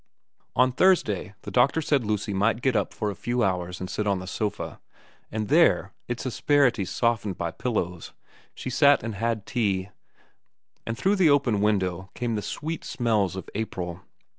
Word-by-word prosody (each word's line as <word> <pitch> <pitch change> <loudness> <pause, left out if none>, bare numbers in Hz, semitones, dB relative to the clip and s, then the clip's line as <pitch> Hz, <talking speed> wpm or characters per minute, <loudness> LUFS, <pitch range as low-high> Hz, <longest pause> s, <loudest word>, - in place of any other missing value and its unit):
On 130 0 +4
Thursday 115 - +2
the - - -6
doctor 130 +5 +3
said 145 -4 +1
Lucy 105 -1 -1
might 115 +5 +1
get 130 -3 +2
up - - +1
for 105 -2 -2
a - - -8
few 120 +3 -1
hours 90 -2 -1
and 95 - -4
sit 105 +3 -2
on 100 -1 +2
the 90 - -6
sofa; 105 +2 -4 0.5
and 110 -1 -2
there, - - +4
its 120 +1 -4
asperities 130 -6 +2
softened 115 -5 0
by 85 - -2
pillows, 90 -8 -3 0.4
she 130 - -5
sat 140 0 +5
and 115 0 -3
had 110 0 -2
tea, 100 -6 -1 1.0
and 115 0 -3
through 200 - +2
the 180 -4 +5
open 135 -8 +3
window 95 -3 0
came 120 -1 -2
the 105 - -1
sweet 155 - -4
smells 110 -7 0
of 95 - -6
April. 90 -5 -4
110 Hz, 170 wpm, -26 LUFS, 95-125 Hz, 1.0 s, sat